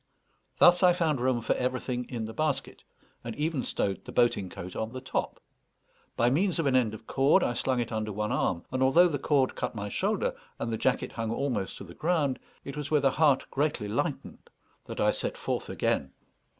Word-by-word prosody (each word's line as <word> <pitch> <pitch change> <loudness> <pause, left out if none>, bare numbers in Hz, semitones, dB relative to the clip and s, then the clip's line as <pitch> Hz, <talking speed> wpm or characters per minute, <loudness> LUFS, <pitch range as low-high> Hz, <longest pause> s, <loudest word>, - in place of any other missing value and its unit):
Thus 175 0 +6
I 180 -1 +6
found 160 -7 0
room 125 -2 +1
for - - +1
everything 125 -1 -2
in 115 -3 -3
the 110 - -7
basket, 155 +3 -2 0.4
and 115 -1 -5
even 150 -2 -1
stowed 100 -5 -2
the - - -9
boating 120 -6 +2
coat 90 +1 -8
on 110 +2 -3
the 130 - -4
top. 130 - -3 0.8
By 120 +1 +3
means 180 +6 +2
of 165 - 0
an 135 -2 +2
end 115 -4 +2
of 110 - -13
cord 140 +10 +3
I 120 - +1
slung 125 +1 0
it 120 -1 -2
under 110 -1 -2
one 105 +1 -2
arm, 85 -1 0
and 130 0 -1
although 160 +7 +6
the 145 -5 -2
cord 140 -2 +2
cut - - -4
my 100 -1 -4
shoulder, 220 - 0 0.2
and 115 - -3
the - - +1
jacket 130 +3 0
hung 115 -1 -3
almost 120 -4 -2
to - - -8
the 85 -3 -11
ground, 155 - 0 0.3
it 140 - -6
was 150 -1 -4
with 150 -2 +2
a 135 - +5
heart 150 -3 +3
greatly 145 -6 0
lightened 105 - -3 0.4
that - - -7
I - - +4
set - - -3
forth - - -3
again. - - -1
130 Hz, 210 wpm, -28 LUFS, 115-150 Hz, 0.8 s, Thus